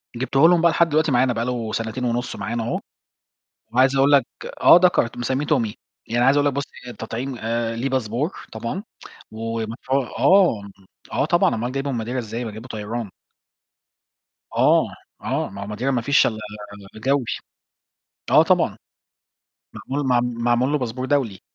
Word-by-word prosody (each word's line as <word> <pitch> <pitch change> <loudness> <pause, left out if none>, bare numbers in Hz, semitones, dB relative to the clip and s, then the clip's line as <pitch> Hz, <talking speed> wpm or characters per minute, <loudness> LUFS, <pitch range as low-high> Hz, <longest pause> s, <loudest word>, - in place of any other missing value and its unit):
جبتُه 130 +2 -1
لهم 175 -1 +4
بقى 170 0 +5
لحد 170 +1 +3
دلوقتي 155 0 +2
معانا 125 0 +3
بقى 115 0 -2
له 120 -3 -3
سنتين 115 +2 -3
ونُص 120 +1 -2
معانا 115 +4 -3
أهو، 120 - -2 0.9
وعايز 130 +2 +3
أقول 135 +2 +4
لك 140 -4 +5 0.3
آه - - +8
دكر 180 -9 +3
مِسميه 130 +4 -1
Tommy. 115 -9 +1 0.3
يعني 120 +2 +1
عايز 135 +2 +5
أقول 145 0 +3
لك 145 - +2
بُص 140 +1 -2 0.2
التطعيم 120 +3 -5 0.4
ليه 120 +4 -2
باسبور 130 - -2
طبعًا 115 - -4 0.5
و 115 +1 -4
مف 115 +4 -10
آه، 140 - +3 0.5
آه - - +1
طبعًا، - - +3
أومال 120 +3 -3
جايبُه 135 +1 -2
من 115 -3 -2
Madeira 125 +3 -4
إزاي، 115 0 -4
ما 110 - -4
جايبُه 110 +4 -10
طيران. 110 -1 -5 1.5
آه، - - +4 0.3
آه، - - -2
ما 100 +1 -9
هو 100 - -6
Madeira 120 - -7
ما 125 -3 0
فيش 140 +5 +4
إلّا 110 - -3 0.6
الجوي. 130 +4 0 1.1
آه - - +7
طبعًا. - - +2 1.1
معمول 140 +1 -2
مع 125 -1 +4
معمول 120 +2 0
له 150 - +2
باسبور 125 -1 -4
دولي. 130 -9 0
125 Hz, 160 wpm, -22 LUFS, 115-135 Hz, 1.5 s, آه